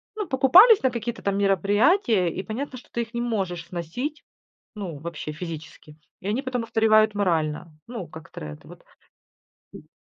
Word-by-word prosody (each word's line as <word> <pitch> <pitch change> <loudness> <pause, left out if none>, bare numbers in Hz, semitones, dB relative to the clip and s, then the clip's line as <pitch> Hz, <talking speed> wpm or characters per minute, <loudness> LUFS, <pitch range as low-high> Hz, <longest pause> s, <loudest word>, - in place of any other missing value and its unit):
ну, 420 -3 -4
покупались 345 - +7
на 260 - +4
какие-то 235 0 -4
там 200 0 -1
мероприятия, 200 - +3
и 190 - -5
понятно, 255 +4 -5
что 245 - -15
ты 235 - -1
их 230 +1 -14
не 235 - -2
можешь 190 -8 -2
сносить, 215 - -5 0.5
ну, 185 -7 -6
вообще, 155 -1 -6
физически. 155 -1 -9 0.2
И 190 - -6
они 220 +6 0
потом 255 -3 -3
устаревают 215 -1 +3
морально. 165 -5 -1 0.2
Ну, 230 -8 -6
как 160 0 -12
тренд, 75 -1 -9
вот 175 +1 -14 0.9
м. - - -12
205 Hz, 160 wpm, -24 LUFS, 170-245 Hz, 0.9 s, покупались